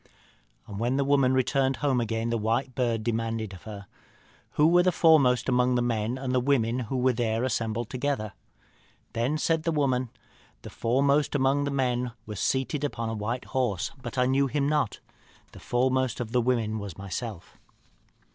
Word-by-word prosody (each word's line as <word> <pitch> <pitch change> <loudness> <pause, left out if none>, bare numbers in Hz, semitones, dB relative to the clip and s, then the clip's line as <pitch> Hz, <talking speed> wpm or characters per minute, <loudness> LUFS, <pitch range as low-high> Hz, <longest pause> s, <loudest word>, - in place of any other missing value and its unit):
"And 100 -1 -7
when 120 +3 0
the 140 - +2
woman 140 -2 +3
returned 135 +1 +1
home 135 -4 +1
again 115 0 -2
the 115 - +1
white 120 +5 -1
bird 115 -3 0
demanded 115 -2 -2
of 90 - -11
her, 100 -1 -8 0.7
'Who 150 - +3
were 175 +2 +6
the 185 +1 +3
foremost 140 -8 +4
among 125 -1 +2
the 120 - +2
men 115 0 -1
and 130 -1 -3
the 130 - +3
women 125 -2 +1
who 130 - -1
were 125 0 +2
there 115 0 -1
assembled 115 -3 -2
together?' 130 -6 -2 0.8
Then 120 +7 0
said 160 +1 +1
the 165 - -1
woman, 130 -5 0 0.5
'The - - -9
foremost 140 +5 +1
among 140 +1 +2
the - - -1
men 125 -3 -1
was 105 -3 -6
seated 135 +2 0
upon 115 -5 -2
a - - -3
white 115 +4 -3
horse, 120 -9 -1
but 120 +1 -7
I 125 - +3
knew 135 +2 +2
him 140 +1 0
not. 150 -8 0 0.5
The - - -12
foremost 130 0 0
of 115 -2 -4
the 125 - +2
women 115 -3 0
was 100 -5 -7
myself.' 100 0 -6
125 Hz, 180 wpm, -27 LUFS, 115-135 Hz, 0.8 s, were